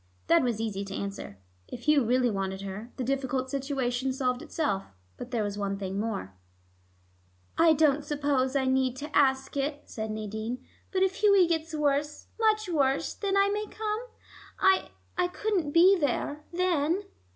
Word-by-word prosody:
That 170 - +5
was 240 -4 0
easy 210 -3 -2
to 195 0 -6
answer. 195 - -5 0.3
If 240 - -8
Hugh 300 -1 +4
really 245 +1 +2
wanted 190 -1 -3
her, 200 +5 -7
the 260 - -2
difficult 260 0 -1
situation 265 -2 -1
solved 255 -1 -1
itself. 200 -11 -2 0.3
But 245 - -8
there 235 -4 0
was 205 0 -3
one 200 -1 -1
thing 195 0 -3
more. 205 - -3 1.2
"I 330 -1 +6
don't 300 -1 +3
suppose 285 -3 0
I 270 -1 +2
need 260 -1 +1
ask 265 -1 +2
it," 285 +1 -2
said 220 -1 -5
Nadine, 220 +3 -4 0.3
"but 380 0 +2
if 380 0 0
Hughie 400 -3 +5
gets 325 -1 -1
worse, 295 0 0
much 430 -2 +2
worse, 280 -5 +1
then 395 -1 -1
I 395 0 +4
may 420 +1 -2
come? 430 0 -3 0.6
I 380 0 +3 0.3
I 360 - +3
couldn't 365 -3 -1
be 350 +6 +6
there, 290 +1 -1
then." 350 0 +1
270 Hz, 160 wpm, -28 LUFS, 230-330 Hz, 1.2 s, I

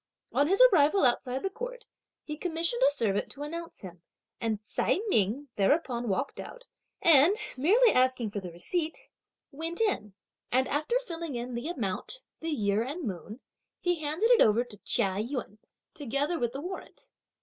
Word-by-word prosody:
On 285 - +3
his 390 +4 +2
arrival 310 +1 +4
outside 250 +1 +1
the 390 - 0
court, - - -7 0.4
he 300 - -5
commissioned 335 +8 -1
a - - +6
servant 220 -8 +1
to 285 - -7
announce 335 +3 -6
him, 180 -3 -10 0.4
and 220 -2 -1
Ts'ai 215 - 0
Ming 245 - +1
thereupon 240 +1 +1
walked 265 +8 -2
out, - - -9 0.4
and 330 +3 +6 0.2
merely 430 - +5
asking 255 -4 +2
for 205 - -3
the 185 -2 -7
receipt, 315 - -2 0.4
went 325 +4 -4
in, 210 - 0 0.4
and, 260 +1 +3
after 305 - 0
filling 330 -5 -5
in 240 +1 -4
the 240 +5 -4
amount, 240 - -4 0.2
the 325 - -4
year 210 -8 +1
and 290 +9 -4
moon, 205 - -6 0.4
he 355 -3 0
handed 315 +11 +1
it 485 - +6
over 220 +3 +5
to 240 -4 -11
Chia 190 0 0
Yün 230 -2 -4 0.3
together 290 +4 -2
with 235 -1 -1
the 275 - -5
warrant. 370 +4 -8
280 Hz, 165 wpm, -29 LUFS, 230-335 Hz, 0.4 s, a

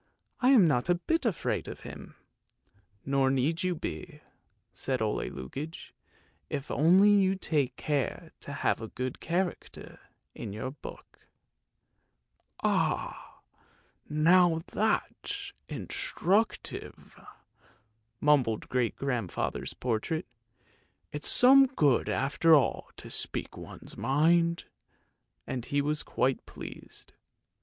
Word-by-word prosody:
I 255 - +3
am 230 -10 +7
not 130 0 +1
a 175 - +5
bit 275 - 0
afraid 190 -8 -1
of - - -8
him! - - -10 0.4
" 100 0 -38
"Nor 135 -1 +2
need 140 +6 +1
you 185 -2 0
be," 80 - -6 0.5
said 130 -1 0
Ole 110 -1 -1
Lukoie; 140 - -7 0.6
"if 140 0 -4
only 185 +7 +5
you 195 -2 +4
take 145 -8 -1
care 145 -5 -2
to - - -8
have - - 0
a 110 - -5
good 130 +2 -5
character 175 +1 -3 0.3
in 105 -4 -7
your 110 +5 -4
book." 140 - -12 0.8
" - - -30
Ah, - - -1 0.7
now, 165 +2 +4
that's 405 - -1 0.2
instructive! 220 - -2 0.5
" 110 +1 -35 0.3
mumbled 135 -7 +2
great 125 -3 0
grandfather's 125 -9 -2
portrait. 130 +8 -2 0.5
" - - -40
It's 150 0 +2
some 270 +2 +7
good 150 - +2
after 155 +4 +4
all 140 -5 +1
to - - -9
speak - - -3
one's - - -10
mind! 165 +6 +2 0.4
" - - -48
and 125 -2 -4
he 145 +3 0
was 150 +1 0
quite 130 0 0
pleased. - - -9
150 Hz, 120 wpm, -29 LUFS, 130-180 Hz, 0.8 s, am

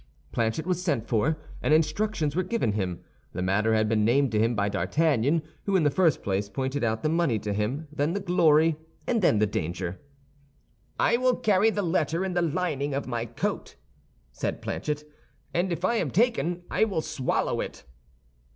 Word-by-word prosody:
Planchet 115 +6 -1
was 180 -1 -1
sent 145 - 0
for, 135 +9 +1 0.2
and 155 - +4
instructions 160 -1 0
were 185 - +2
given 185 - 0
him. 95 -4 -3 0.3
The 90 - -3
matter 105 +4 +2
had 110 0 +2
been 105 -1 +2
named 130 +3 +3
to 110 - +1
him 115 +2 +2
by 100 -1 +1
D'Artagnan, 140 - +1 0.2
who 200 - +1
in 180 - +4
the 145 - +3
first 165 -2 +2
place 100 +1 -1
pointed 130 +3 -2
out 110 -1 0
the - - +2
money 165 -8 +2
to 105 -1 -3
him, 120 +10 -2
then 150 +3 0
the 200 - -1
glory, 165 -4 +3 0.3
and 230 -3 +1
then 140 - +4
the 105 - +4
danger. 90 -1 -3 1.0
"I 235 - +4
will 255 0 +2
carry 210 0 +3
the 205 -2 -1
letter 165 0 0
in 190 - -2
the 175 - +1
lining 150 -4 -1
of 140 - -2
my 120 -2 -3
coat," 115 - -3 0.6
said 60 - -3
Planchet; 150 0 -3 0.5
"and 175 +2 0
if 170 +1 -1
I 235 +4 +2
am 165 - 0
taken 180 - +1
I - - +2
will 195 -7 0
swallow 130 -4 -1
it." - - -7
150 Hz, 190 wpm, -27 LUFS, 110-175 Hz, 1.0 s, and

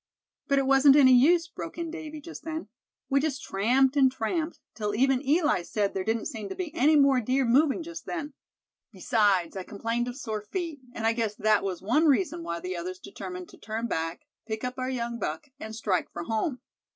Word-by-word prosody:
"But 280 - +2
it 275 - +2
wasn't 270 +1 +6
any 265 -3 +7
use," 330 +7 +5
broke 330 0 -8
in 335 -1 -4
Davy 310 -2 -7
just 335 +3 -9
then. 320 0 -5 0.4
"We 275 0 +3
just 275 -2 -2
tramped 255 +7 +2
and 265 -2 +5
tramped 310 +7 -2
till 210 -2 -2
even 260 +2 +3
Eli 300 - +2
said 200 +3 -1
there 190 - -2
didn't 225 +2 -1
seem 220 -7 -5
to - - -5
be 345 -5 -5
any 310 -2 +4
more 275 -3 +5
deer 260 +3 +1
moving 280 +6 +3
just 330 -1 -9
then. 300 -4 -4 0.6
Besides, 200 -7 +1
I 190 - -3
complained 230 +5 -2
of 245 +1 -5
sore 220 -5 -4
feet; 325 - -4 0.2
and 225 - -3
I 225 - +4
guess 225 -3 -1
that 215 -1 +2
was 190 -2 -3
one 300 +11 +3
reason 335 +3 +2
why 170 - -4
the 185 +1 -4
others 180 +2 -5
determined 185 -1 -8
to - - -16
turn 220 +2 -4
back, 165 -6 -2 0.3
pick 220 0 -4
up 250 +1 -4
our 255 0 -2
young 235 -2 -3
buck, 160 - -4
and 220 -3 -7
strike 200 -5 -1
for 170 - -5
home." 225 - -2
250 Hz, 210 wpm, -27 LUFS, 210-295 Hz, 0.6 s, any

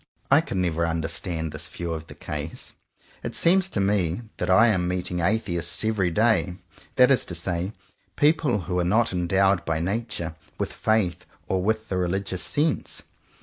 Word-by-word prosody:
I - - +7
can 95 - -3
never 85 -2 +1
understand 80 0 -2
this 75 +3 -5
view 85 -1 -4
of 80 0 -6
the - - -11
case. 75 +1 -6 0.5
It - - -5
seems 190 +2 +3
to 110 - -2
me 95 0 +1
that - - -2
I 105 +5 +7
am 90 -4 +1
meeting 90 0 -2
Atheists 95 0 0
every 105 -5 +1
day; 100 -2 +2 0.4
that 125 0 +6
is 135 - +4
to 90 - -4
say 90 +3 -2 0.4
people 145 - +3
who 90 +1 -2
are - - +2
not 110 +5 +2
endowed 95 +1 +2
by 80 -1 -1
nature 90 -3 -3 0.2
with - - -3
faith 100 -6 0 0.2
or 95 -1 0
with 110 +3 -1
the 95 - -1
religious 90 +1 -1
sense. 150 +1 -1
90 Hz, 170 wpm, -25 LUFS, 85-110 Hz, 0.5 s, I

